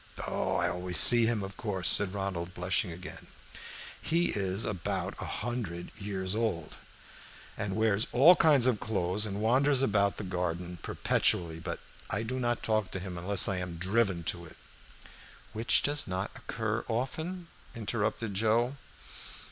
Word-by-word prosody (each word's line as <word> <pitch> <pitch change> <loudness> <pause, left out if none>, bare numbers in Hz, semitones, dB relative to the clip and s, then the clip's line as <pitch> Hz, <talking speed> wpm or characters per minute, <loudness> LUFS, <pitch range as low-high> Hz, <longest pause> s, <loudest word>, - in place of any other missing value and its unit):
"Oh, - - -1
I 85 - +1
always 90 0 0
see 120 +4 +8
him, 110 -3 0
of 95 0 -8
course," 95 -5 -1
said 100 -1 +3
Ronald, 95 -3 -4
blushing 90 +1 0
again. 90 +2 -9 0.7
"He 170 +2 +1
is 100 +1 0
about 95 -6 -2
a - - -3
hundred 105 -8 -4
years 100 -3 -3
old, 105 -8 -2 0.8
and 100 -2 -3
wears 110 -1 +2
all 155 +9 +7
kinds 145 -8 +4
of 125 -5 +2
clothes, 105 0 -1
and 100 0 -4
wanders 135 +4 +3
about 100 -4 +2
the - - -5
garden 90 -1 -3
perpetually. 80 -2 +1
But - - -5 0.3
I - - -1
do 130 +3 -3
not 120 -1 -1
talk 110 -3 +1
to 95 - -3
him 90 -1 -6
unless 90 +2 +4
I 95 - -1
am 90 -1 -4
driven 95 0 0
to 85 +2 -3
it" 80 - -13 1.0
"Which 115 +2 +2
does 145 0 +1
not 95 +2 -3
occur 110 -4 -3
often," 160 +10 -3 0.3
interrupted 110 -1 -2
Joe. 115 +6 +1
100 Hz, 155 wpm, -30 LUFS, 90-115 Hz, 1.0 s, see